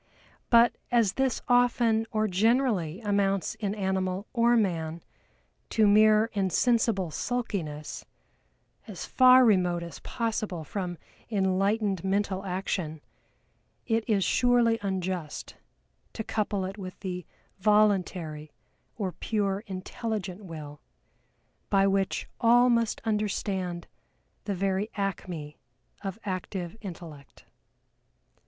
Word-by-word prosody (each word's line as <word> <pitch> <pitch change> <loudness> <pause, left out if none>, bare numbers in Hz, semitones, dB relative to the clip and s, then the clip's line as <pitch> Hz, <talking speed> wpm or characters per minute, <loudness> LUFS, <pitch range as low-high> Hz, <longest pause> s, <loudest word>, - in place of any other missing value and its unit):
But, 235 0 +5
as 230 -5 +3
this 265 -2 0
often 240 -2 +3
or 215 -1 0
generally 210 - +1
amounts 200 -2 +1
in 205 -1 -2
animal 190 -1 -1
or 235 0 +4
man 170 -5 -1 0.7
to 220 - +3
mere 215 +2 +5
insensible 200 -1 +1
sulkiness 170 -11 -3 0.8
as - - -6
far 255 0 +7
remote 180 -5 +2
as 170 - -8
possible 215 -7 -3
from 180 +1 -4 0.3
enlightened 195 -1 +1
mental 195 0 0
action, 180 -4 -3 0.8
it 225 -1 +1
is 200 -3 +3
surely 240 +2 +3
unjust 185 -5 -4 0.6
to 220 - -4
couple 205 -3 -1
it 195 +2 -6
with 185 -1 -8
the 180 -4 -5 0.3
Voluntary 185 -7 +1 0.4
or 195 -5 -2
pure 200 0 -1
intelligent 195 0 -4
Will, 150 -4 -9 0.9
by 195 -1 +4
which 195 -1 0
all 245 +2 +5
must 230 -2 +1
understand 195 -4 -2 0.6
the 200 - -2
very 195 +3 0
acme 180 -7 -4 0.4
of 195 -1 -4
active 185 -1 -4
Intellect. 165 -7 -10
195 Hz, 105 wpm, -28 LUFS, 180-220 Hz, 0.9 s, far